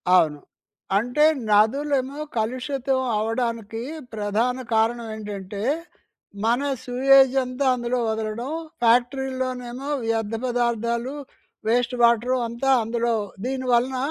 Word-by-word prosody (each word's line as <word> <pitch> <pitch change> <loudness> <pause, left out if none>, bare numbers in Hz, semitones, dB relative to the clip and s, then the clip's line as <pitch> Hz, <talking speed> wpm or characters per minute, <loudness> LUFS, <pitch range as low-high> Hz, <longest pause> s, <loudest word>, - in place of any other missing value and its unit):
అవును. 155 -5 +3 0.6
అంటే 245 +8 +2 0.2
నదులేమో 265 +6 +2 0.2
కలుషితం 260 +3 -1 0.2
అవ్వడానికి 225 0 -2 0.3
ప్రధాన 220 +4 0 0.2
కారణం 230 +1 +1
ఏంటంటే, 205 -2 -6 0.8
మన 235 +2 +3 0.3
సూయేజంతా 265 +1 +4
అందులో 245 0 -1
వదలడం. 220 +4 -3 0.3
ఫ్యాక్టరీలోనేమో 255 +1 0 0.2
వ్యర్థ 225 -1 -1
పదార్థాలు, 235 +1 -1 0.5
వేస్ట్ 245 +2 +1
వాటరు, 235 +2 +4
అంతా 235 +4 -2
అందులో 235 +1 0 0.3
దీనివలన 255 -1 +1
240 Hz, 85 wpm, -24 LUFS, 225-255 Hz, 0.8 s, సూయేజంతా